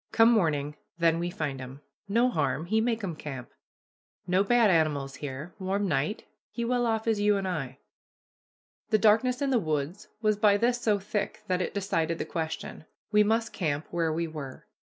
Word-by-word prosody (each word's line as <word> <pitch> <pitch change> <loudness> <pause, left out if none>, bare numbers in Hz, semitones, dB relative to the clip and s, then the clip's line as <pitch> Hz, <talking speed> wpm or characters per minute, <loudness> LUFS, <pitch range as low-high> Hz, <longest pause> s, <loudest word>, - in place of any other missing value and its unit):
Come 225 +1 +6
morning, 150 -8 +1 0.2
then 165 -1 +3
we 175 +1 -1
find 145 -6 -4
'em. 130 +2 -9 0.3
No 230 +5 +3
harm 140 - 0
he 220 +5 +2
make 230 -1 -1
'em 175 -5 -3
camp. 135 -5 -7 0.7
No 185 +2 +3
bad 230 -1 +4
animals 145 -5 +1
here 145 +4 -6
warm 195 +2 -1
night 150 +5 -1 0.3
he 235 - -3
well 245 0 +1
off 225 -1 0
as 225 -2 +1
you 205 0 +3
and 195 -1 -2
I." 135 -7 -3 1.1
The 215 - +4
darkness 225 +5 +3
in 275 - +1
the 250 - +4
woods 155 +1 -3
was 215 -2 +2
by 205 -1 +4
this 240 +3 +1
so 215 -3 +2
thick 205 +1 -3
that 185 -2 0
it 180 - -3
decided 165 -5 0
the - - -3
question. 160 -1 -5 0.3
We 210 0 +5
must 225 +1 0
camp 155 -5 -1
where 165 -2 0
we 165 +1 -1
were. 145 -5 -8
185 Hz, 185 wpm, -28 LUFS, 155-220 Hz, 1.1 s, Come